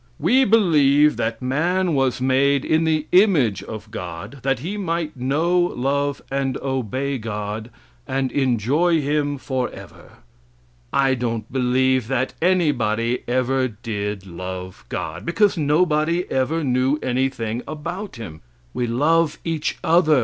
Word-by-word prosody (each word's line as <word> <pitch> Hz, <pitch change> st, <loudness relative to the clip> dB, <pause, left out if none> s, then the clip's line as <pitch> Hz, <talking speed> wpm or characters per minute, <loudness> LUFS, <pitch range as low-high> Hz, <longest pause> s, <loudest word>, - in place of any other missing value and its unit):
"We 250 Hz, -, +3 dB
believe 150 Hz, -8 st, +4 dB
that 115 Hz, +2 st, -2 dB
man 170 Hz, +7 st, +1 dB
was 135 Hz, -3 st, +1 dB
made 135 Hz, +2 st, +2 dB
in 160 Hz, +1 st, +2 dB
the 155 Hz, -1 st, +1 dB
image 175 Hz, -, +4 dB
of 110 Hz, 0 st, -8 dB
God, 100 Hz, +6 st, -7 dB
that 135 Hz, +1 st, +1 dB
he 170 Hz, -, -5 dB
might 170 Hz, -5 st, -2 dB
know, 150 Hz, +8 st, +1 dB
love 140 Hz, -3 st, 0 dB
and 135 Hz, -1 st, -1 dB
obey 130 Hz, +1 st, -2 dB
God, 105 Hz, 0 st, -5 dB, 0.4 s
and 135 Hz, 0 st, -1 dB
enjoy 140 Hz, +6 st, +2 dB
Him 145 Hz, 0 st, 0 dB
for 130 Hz, -2 st, -2 dB
ever." -, -, -13 dB, 0.8 s
I 135 Hz, -1 st, +3 dB
don't 115 Hz, -3 st, -3 dB
believe 130 Hz, -1 st, +2 dB
that 130 Hz, 0 st, -1 dB
anybody 125 Hz, -10 st, +1 dB
ever 130 Hz, +1 st, +1 dB
did 105 Hz, -4 st, -5 dB
love 95 Hz, +1 st, -7 dB
God, 80 Hz, +2 st, -4 dB
because 205 Hz, +4 st, +2 dB
nobody 155 Hz, +2 st, +1 dB
ever 150 Hz, +5 st, 0 dB
knew 130 Hz, +2 st, +1 dB
anything 125 Hz, -3 st, -1 dB
about 170 Hz, +6 st, -6 dB
Him. 85 Hz, -10 st, -9 dB, 0.3 s
We 120 Hz, -, -1 dB
love 150 Hz, +7 st, +2 dB
each 160 Hz, -2 st, -2 dB
other. 160 Hz, -4 st, +4 dB
135 Hz, 130 wpm, -22 LUFS, 120-155 Hz, 0.8 s, believe